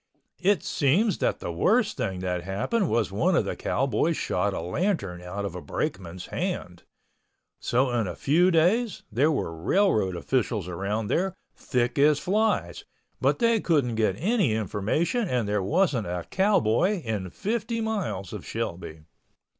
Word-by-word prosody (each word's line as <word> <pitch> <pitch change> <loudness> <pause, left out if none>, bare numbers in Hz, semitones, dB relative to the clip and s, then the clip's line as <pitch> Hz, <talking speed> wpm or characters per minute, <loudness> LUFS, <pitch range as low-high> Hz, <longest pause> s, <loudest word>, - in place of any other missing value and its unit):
It 190 -3 +2
seems 185 - +2
that - - 0
the 85 - -3
worst 210 - +2
thing 95 -8 -3
that 90 -1 -2
happened 105 - -1
was 110 -5 +1
one 100 - +2
of - - +2
the - - -3
cowboys 135 +5 0
shot 95 +3 0
a - - -3
lantern 90 - -2
out 95 +3 -5
of 100 - -4
a 90 - -6
brakeman's 95 - -4
hand. - - -3 0.8
So 125 +2 +1
in 115 -4 0
a 90 - -5
few 170 +6 +3
days 185 +6 +2
there 140 +9 +3
was 150 - 0 0.2
railroad 110 - +2
officials 110 0 -1
around 100 +5 -2
there, 180 - 0 0.2
thick 125 0 -1
as 150 +1 +5
flies, 210 +7 0 0.4
but - - +2
they 230 -2 +3
couldn't 145 - +1
get 110 -4 +1
any 195 - +1
information 110 - -1
and 120 -4 0
there 105 0 0
wasn't 145 - +1
a 90 0 -3
cowboy 190 - +2
in 105 -5 -3
fifty 230 - -2
miles 200 - -3
of - - -6
Shelby. 85 -2 -5
125 Hz, 155 wpm, -26 LUFS, -, 0.8 s, as